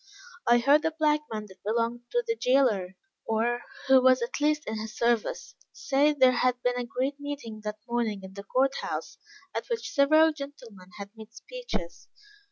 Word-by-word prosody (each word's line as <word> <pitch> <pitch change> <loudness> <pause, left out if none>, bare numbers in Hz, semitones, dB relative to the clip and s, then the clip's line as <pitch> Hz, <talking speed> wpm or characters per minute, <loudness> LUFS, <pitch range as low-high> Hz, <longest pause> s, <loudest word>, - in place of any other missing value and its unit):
I 240 - +6
heard 280 +5 +4
a 320 - +2
black 300 -1 +3
man 215 -1 -4
that 190 -2 -17
belonged 235 +2 -1
to 485 0 0
the 455 -1 0
jailer, 245 - +2 0.3
or, 235 +2 0 0.3
who 265 -1 +7
was 255 -1 +4
at 235 - -4
least 300 0 +1
in 220 0 -4
his 215 0 -7
service, 235 -2 0 0.2
say 285 -8 +2
that 295 - -7
there 260 -1 +7
had 250 0 +1
been 245 0 +1
a 245 - -3
great 265 +4 -2
meeting 280 -7 -6
that 210 0 -3
morning 230 -4 -1
in 190 0 -10
the 200 0 -8
court 265 +6 +1
house, - - -5 0.4
at - - -3
which 470 -1 -3
several 310 +2 +5
gentlemen 250 -10 -10
had 200 0 -8
made 220 0 -12
speeches. 460 - -6
245 Hz, 185 wpm, -27 LUFS, 220-285 Hz, 0.4 s, who